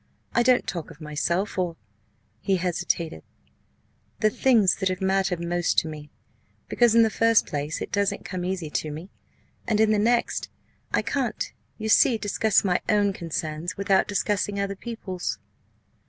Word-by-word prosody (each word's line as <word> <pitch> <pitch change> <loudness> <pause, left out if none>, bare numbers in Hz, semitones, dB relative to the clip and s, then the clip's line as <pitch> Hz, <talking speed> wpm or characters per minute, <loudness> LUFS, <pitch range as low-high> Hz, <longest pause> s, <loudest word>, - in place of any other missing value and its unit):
I 240 - +3
don't 250 0 +4
talk 170 -3 -4
of - - -14
myself 170 +6 -1
or" 175 -2 -1 0.6
he 195 +9 +1
hesitated 175 - -1 1.0
"the 215 0 +3
things 225 -6 +3
that 190 -1 0
have 185 0 -2
mattered 190 -2 +1
most 170 0 -1
to - - +3
me 150 -1 -8 0.6
because, 240 -2 +3
in 230 - +7
the 220 - +2
first 230 0 +4
place, 145 +1 -3
it - - -8
doesn't 200 -1 0
come 185 -2 -4
easy 180 -4 -3
to 155 - -2
me 160 +6 -8 0.6
and, 215 -2 +1
in 220 0 +4
the 210 - +3
next, 235 +3 +1 0.4
I - - +1
can't, - - -2 0.2
you 220 - -4
see, 225 +2 +5
discuss 215 0 +2
my 180 -3 +1
own 205 -2 +3
concerns 165 +1 -4
without 195 -1 +2
discussing 205 0 -1
other 200 0 -2
people's." 195 -4 -5
190 Hz, 160 wpm, -25 LUFS, 170-215 Hz, 1.0 s, in